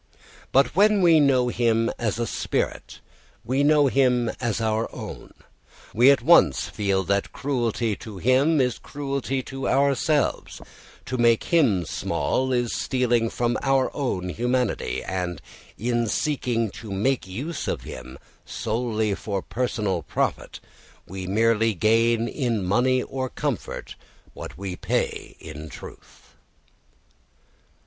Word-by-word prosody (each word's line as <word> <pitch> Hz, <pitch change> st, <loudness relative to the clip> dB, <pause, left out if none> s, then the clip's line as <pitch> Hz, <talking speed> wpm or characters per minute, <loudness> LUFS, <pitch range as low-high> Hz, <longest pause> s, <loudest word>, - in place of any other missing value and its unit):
But 135 Hz, +3 st, +3 dB
when 205 Hz, 0 st, +4 dB
we 165 Hz, -2 st, +6 dB
know 130 Hz, -4 st, +3 dB
him 115 Hz, -1 st, +1 dB
as 110 Hz, -3 st, -1 dB
a 120 Hz, -, -1 dB
spirit -, -, -3 dB, 0.4 s
we 130 Hz, +4 st, +1 dB
know 150 Hz, 0 st, +5 dB
him 125 Hz, -3 st, +2 dB
as 120 Hz, -4 st, -1 dB
our 110 Hz, 0 st, 0 dB
own. -, -, -8 dB, 0.6 s
We 120 Hz, +4 st, +6 dB
at 140 Hz, -4 st, +4 dB
once 135 Hz, -, +5 dB
feel 100 Hz, -2 st, 0 dB
that 100 Hz, +1 st, -1 dB
cruelty 120 Hz, -5 st, -1 dB
to 105 Hz, -3 st, -9 dB
him 130 Hz, -, +3 dB
is 125 Hz, -2 st, +1 dB
cruelty 135 Hz, -2 st, -3 dB
to 135 Hz, +1 st, -4 dB
ourselves, 140 Hz, +2 st, +1 dB, 0.5 s
to 130 Hz, -, -3 dB
make 115 Hz, -1 st, +4 dB
him 110 Hz, -, +3 dB
small 130 Hz, +10 st, -1 dB
is 120 Hz, -2 st, 0 dB
stealing 120 Hz, -3 st, +1 dB
from 120 Hz, +1 st, -1 dB
our 135 Hz, -1 st, +1 dB
own 95 Hz, -10 st, -2 dB
humanity, 120 Hz, -, -1 dB
and 90 Hz, -3 st, -3 dB, 0.4 s
in 120 Hz, 0 st, 0 dB
seeking 115 Hz, -3 st, -1 dB
to 115 Hz, -2 st, -10 dB
make 105 Hz, +4 st, 0 dB
use 135 Hz, -, -5 dB
of -, -, -2 dB
him 60 Hz, +1 st, -9 dB, 0.3 s
solely 110 Hz, -2 st, -2 dB
for 100 Hz, -1 st, -4 dB
personal 110 Hz, -7 st, -2 dB
profit -, -, -2 dB, 0.5 s
we 95 Hz, 0 st, -7 dB
merely 115 Hz, +2 st, +2 dB
gain 115 Hz, +4 st, +2 dB
in 120 Hz, -8 st, -1 dB
money 125 Hz, +6 st, +2 dB
or 130 Hz, -1 st, -4 dB
comfort -, -, -4 dB, 0.4 s
what -, -, -9 dB
we 95 Hz, -1 st, -5 dB
pay -, -, -2 dB
in 80 Hz, -1 st, -9 dB
truth. 70 Hz, -, -13 dB
120 Hz, 130 wpm, -24 LUFS, 105-130 Hz, 0.6 s, we